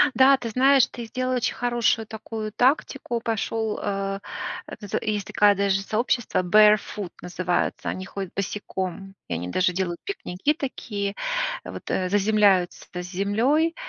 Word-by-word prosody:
Да, 265 +1 +7
ты 240 -3 -5
знаешь, 265 +3 +5
ты 235 - -8
сделал 255 +3 -2
очень 245 - 0
хорошую 240 -2 +1
такую 220 0 -6
тактику, 255 0 +1
пошёл, 225 -1 -1
э 195 -1 -2 0.6
З 205 -1 -2
есть 210 -3 -2
такая 205 -1 +4
даже 195 0 +1
сообщество, 225 +1 0
Barefoot 210 -1 +4
называются, 180 0 -1
они 185 - -4
ходят 195 -1 -6
босиком, 195 -1 -4
и - - -3
они 85 +2 -3
даже 180 - +2
делают 175 -2 -2
пикники 295 - -1
такие, 205 -8 -4 0.5
вот, - - -8
э, 185 -1 0
заземляются 200 -2 +3
с 180 0 -3
землёй. 250 - +2
210 Hz, 140 wpm, -25 LUFS, 195-240 Hz, 0.6 s, Да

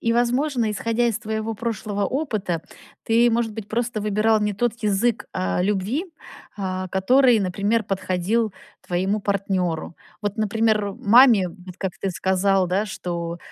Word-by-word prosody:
и 230 - +1
возможно, 245 0 +1
исходя 230 +3 0
из 225 - -1
твоего 220 +1 -3
прошлого 210 -2 -3
опыта, 205 - -2 0.4
ты, 235 +1 +3
может 230 -1 0
быть, 215 -1 -7
просто 230 0 -2
выбирал 215 +1 +2
не 210 0 0
тот 235 +3 0
язык, 215 +3 +1
а, 185 -1 -1
любви, 210 - 0 0.5
а, 185 -2 -3
который, 245 +6 +4
например, 200 +4 0
подходил 195 +3 -1 0.3
твоему 190 +4 0
партнеру. 190 -5 -1 0.2
Вот, 205 +1 -3
например, 215 -1 +1
маме, 220 -3 +5
вот 180 0 -12
как 190 -2 -2
ты 195 - -2
сказал, 190 +1 +1
да, 190 +4 0
что 170 -4 -4
210 Hz, 140 wpm, -23 LUFS, 190-230 Hz, 0.5 s, маме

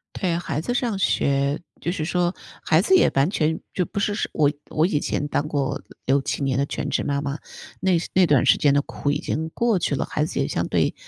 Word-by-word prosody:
对， 175 -3 0
孩 150 -4 -3
子 245 - -2
上 240 -4 0
学。 140 -4 +1 0.2
就 170 - -1
是 155 -4 -3
说 175 +1 0 0.3
孩 160 - +3
子 375 - +4
也 - - +5
完 135 +3 +4
全 160 -3 0
就 180 - +1
不 200 - -4
是 205 +1 -1
我 145 -2 +3 0.2
我 155 +2 +2
以 155 -6 +1
前 145 - -2
当 145 +1 -1
过 140 -3 -1 0.2
6，7 140 +1 +1
年 135 -2 0
的 140 - +2
全 145 - -3
职 - - 0
妈 140 0 -1
妈， 145 +1 -3 0.4
那 190 -1 +2 0.2
那 185 -2 +5
段 140 -3 +4
时 120 - +6
间 145 - +4
的 140 0 +2
苦 145 - -3
已 145 - +2
经 160 +1 -3
过 230 -6 +2
去 145 - 0
了， - - -1
孩 150 - -1
子 - - -3
也 - - +1
相 - - -1
对 - - +1
155 Hz, 245 characters per minute, -23 LUFS, 140-180 Hz, 0.4 s, 时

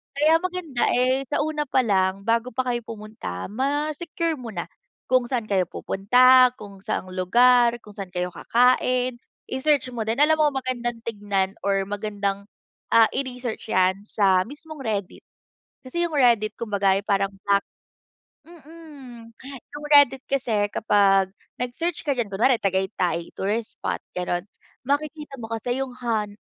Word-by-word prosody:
Kaya 310 +3 +4
maganda, 355 -7 -2
eh, 255 +2 +2
sa 290 +3 -1
una 300 0 -2
pa 260 -1 +2
lang, 190 -3 +1
bago 230 +3 0
pa 260 - 0
kayo 240 -2 -2
pumunta, 210 - -7
ma-secure 300 +6 -2
mo 235 -3 -8
na, - - -5 0.4
kung 255 -1 +3
saan 240 -4 -3
kayo 190 -2 +2
pupunta, 250 +8 +4
kung 200 -2 -11
saang 185 - -3
lugar, 240 +6 +4
kung 210 - -14
saan 190 -2 -7
kayo 180 0 -2
kakain, 250 +3 +2 0.3
i-search 270 -1 +1
mo 235 -3 -4
din. 230 +5 0
Alam 315 +1 +5
mo 305 - +3
magandang 240 -3 -3
tingnan 205 -3 -2
or 195 -1 +2
magandang, 200 -1 -3 0.5
ah, 225 -1 +6
i-research 250 -4 -5
'yan 185 +2 +2
sa 190 -4 +2
mismong 300 +3 -11
Reddit, 205 -4 -4 0.6
kasi 345 +7 -2
yung 330 - -5
Reddit 235 -6 +3
kumbaga 200 -4 +1
ay - - -2
parang 195 -1 +1
black 200 0 +3 0.9
mm, 295 -7 -13 0.5
yung 295 - -7
Reddit 270 -2 +6
kasi 225 -7 0
kapag 195 -2 +3 0.3
nag-search 300 +8 -2
ka 285 - +2
diyan, 230 -5 -2
kunwari 235 +6 +3
Tagaytay 185 -3 -1
tourist 215 +3 -2
spot, - - -3 0.2
gano'n. 180 0 -2 0.4
Makikita 295 0 -2
mo 225 - -6
kasi 245 +3 -2
yung 260 -2 -5
hon 220 -4 -2
235 Hz, 145 wpm, -24 LUFS, 200-270 Hz, 0.9 s, ah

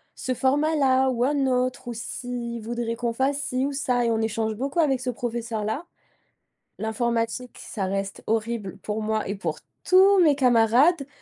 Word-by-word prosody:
ce 255 - -2
format 290 +5 +1
là 265 -1 +3
ou 245 -1 0
un 280 0 +1
autre, 255 -1 -1
ou - - -3
s'il 235 0 -5
voudrait 235 0 -3
qu'on 235 0 -2
fasse 275 +3 0
ci 255 +1 -1
ou - - -3
ça 250 -3 0
et - - +2
on 220 - +1
échange 220 0 -1
beaucoup 275 +7 -2
avec 270 -5 +3
ce 255 -1 -3
professeur 235 -2 -3
là. 245 +11 -3 0.9
L'informatique 230 +2 -2
ça 195 -4 -4
reste 195 +1 -3
horrible 220 -3 -2
pour 215 +2 -3
moi 215 0 -1
et 200 - -2
pour 165 -5 -4 0.2
tous 380 +1 +6
mes 305 -5 +5
camarades, 260 +5 +4
240 Hz, 175 wpm, -25 LUFS, 225-265 Hz, 0.9 s, tous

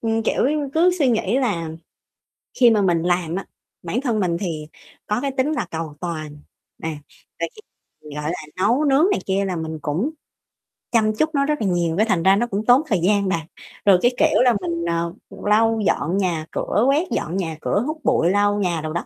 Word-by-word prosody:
ừm, 225 0 0
kiểu - - +1
như, 295 -1 -1
cứ 340 +3 +5
suy 280 -5 +3
nghĩ 225 0 +1
là 195 -11 -1 0.9
khi 245 - +7
mà 220 -2 +3
mình 175 -4 +2
làm 175 -1 0
á, 195 - -4 0.4
bản 175 +9 -2
thân 240 -6 0
mình 175 -4 0
thì 160 -6 -4 0.4
có 210 - 0
cái 280 0 -1
tính 265 +4 +1
là 310 - -1
cầu 160 -2 -5
toàn, 155 -4 -5 0.5
à, 160 - -1 0.5
rồi - - -1
khi 430 - -13 0.4
mình, 150 -1 -10
gọi 150 +2 -2
là, 180 - -4 0.2
nấu 235 +10 +2
nướng 285 +3 +4
này - - +1
kia 195 +1 0
là 185 -2 -2
mình 160 -1 -5
cũng 160 - -1 0.8
chăm 215 -2 +2
chút 310 +8 +1
nó 280 0 +2
rất 300 -2 -1
là 210 - +1
nhiều, 175 -2 0
cái 215 - +4
thành 185 -7 0
ra 190 +2 +6
nó 235 +4 0
cũng 210 -1 -3
tốn 245 +4 +6
thời 205 -9 +1
gian 200 +3 +2
bà. 170 -3 0 0.4
Rồi 195 -2 +7
cái 245 - +4
kiểu - - +3
là 250 -1 +5
mình, 170 -1 -3
ờ, 170 0 -1 0.3
lau 225 +2 +3
dọn 170 +3 +1
nhà 175 -5 -1
cửa, 210 - 0
quét 295 +6 +2
dọn 170 +4 -2
nhà 165 -5 -3
cửa, 205 - 0
hút 310 +1 -3
bụi, 240 -9 +2
lau 205 +1 +2
nhà 175 -5 0
đồ 155 0 -4
đó, 170 - -3
195 Hz, 220 wpm, -21 LUFS, 170-240 Hz, 0.9 s, khi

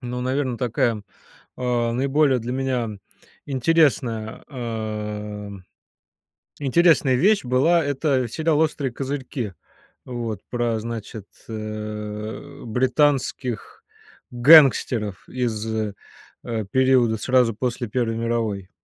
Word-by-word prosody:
но, 125 0 -4
наверно, 130 0 -1
такая, 120 -2 0 0.5
а, 120 -2 0
наиболее 135 +2 +2
для 120 +1 -4
меня 130 -3 -1 0.6
интересная 130 -6 +1
а, 105 -4 -5 1.1
интересная 150 -1 +4
вещь 200 +10 +3
была- 140 +7 +3
это 140 -2 0
сериал 160 +4 +1
"Острые 150 -4 0
козырьки". 130 -4 -4 0.5
Вот, 115 -5 -4
про, 120 -2 0
значит, 110 -2 -6 0.2
э, 105 0 -6
британских 130 0 0 0.5
гангстеров 120 - +5
из, 115 -4 -2
э, 110 -2 -2 0.8
периода 130 -3 +3
сразу 125 -1 +2
после 120 +1 -2
Первой 115 -1 -1
мировой. 115 -5 -2
125 Hz, 90 wpm, -23 LUFS, 110-135 Hz, 1.1 s, гангстеров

